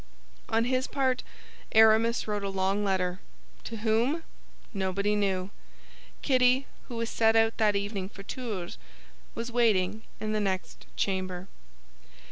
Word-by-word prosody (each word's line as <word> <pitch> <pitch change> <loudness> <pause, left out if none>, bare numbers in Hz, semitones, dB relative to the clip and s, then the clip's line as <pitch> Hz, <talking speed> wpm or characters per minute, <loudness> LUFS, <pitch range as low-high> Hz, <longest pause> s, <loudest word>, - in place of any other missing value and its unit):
On 225 +1 +2
his 255 +1 +1
part 260 -2 0 0.5
Aramis 220 +1 +5
wrote 210 -1 -2
a 200 - -1
long 195 +1 0
letter. 185 -2 0 0.5
To 230 - -5
whom? 230 +9 +1 0.5
Nobody 200 +1 0
knew. 195 -2 0 0.7
Kitty, 255 0 +4 0.2
who 245 - -7
was 230 0 -2
to - - -9
set 225 0 +4
out 225 0 +3
that 210 -2 +3
evening 200 -1 -2
for 195 - -11
Tours, 205 -7 -5 0.6
was 235 +1 -4
waiting 220 -4 +2 0.2
in 215 0 -2
the 215 - +1
next 190 -2 -3
chamber. 185 -1 -2
215 Hz, 135 wpm, -29 LUFS, 195-230 Hz, 0.7 s, Aramis